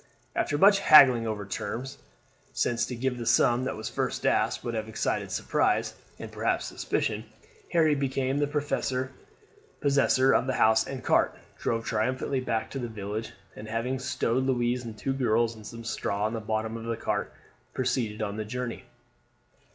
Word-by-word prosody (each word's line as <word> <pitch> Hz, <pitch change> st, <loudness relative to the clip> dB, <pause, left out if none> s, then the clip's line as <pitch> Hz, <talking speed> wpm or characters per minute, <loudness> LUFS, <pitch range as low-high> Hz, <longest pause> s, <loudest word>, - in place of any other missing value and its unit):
After 145 Hz, -, 0 dB
much 200 Hz, +5 st, +6 dB
haggling 130 Hz, -9 st, +7 dB
over 105 Hz, -2 st, -3 dB
terms 125 Hz, +7 st, -5 dB, 0.5 s
since 120 Hz, -1 st, 0 dB
to 125 Hz, -, -5 dB
give 125 Hz, +1 st, -2 dB
the 120 Hz, -, -4 dB
sum 120 Hz, +1 st, +3 dB
that 130 Hz, -, -2 dB
was 110 Hz, 0 st, -5 dB
first -, -, -2 dB
asked -, -, +1 dB
would 120 Hz, -, -3 dB
have 110 Hz, -1 st, -3 dB
excited 110 Hz, -, -1 dB
surprise, -, -, +1 dB, 0.2 s
and -, -, -8 dB
perhaps -, -, -1 dB
suspicion -, -, -2 dB, 0.5 s
Harry 160 Hz, -3 st, +4 dB
became 135 Hz, -1 st, -1 dB
the 145 Hz, -, +2 dB
possessor 140 Hz, -1 st, -1 dB
of -, -, +2 dB
the 130 Hz, -, 0 dB
horse 110 Hz, -1 st, +4 dB
and 130 Hz, -3 st, -6 dB
cart, -, -, +2 dB, 0.2 s
drove 115 Hz, 0 st, -1 dB
triumphantly 130 Hz, +4 st, -1 dB
back 115 Hz, -3 st, -2 dB
to 135 Hz, -, -4 dB
the 120 Hz, -, -3 dB
village, 105 Hz, +1 st, -5 dB, 0.2 s
and 105 Hz, -, -9 dB
having 115 Hz, +4 st, -2 dB
stowed 130 Hz, -1 st, 0 dB
Louise 125 Hz, -1 st, 0 dB
and 115 Hz, -2 st, -7 dB
the -, -, -17 dB
two 135 Hz, -, -1 dB
girls 115 Hz, -3 st, +1 dB
on 110 Hz, -, -12 dB
some 115 Hz, +2 st, -9 dB
straw 105 Hz, -2 st, -2 dB
in 110 Hz, -, -1 dB
the 115 Hz, -, -2 dB
bottom 110 Hz, +1 st, -2 dB
of 115 Hz, -, -8 dB
the 115 Hz, -1 st, -2 dB
cart, -, -, -2 dB, 0.4 s
proceeded 120 Hz, -4 st, -1 dB
on 100 Hz, 0 st, -3 dB
the 110 Hz, -, -2 dB
journey. 125 Hz, +2 st, -5 dB
120 Hz, 175 wpm, -28 LUFS, 110-130 Hz, 0.5 s, haggling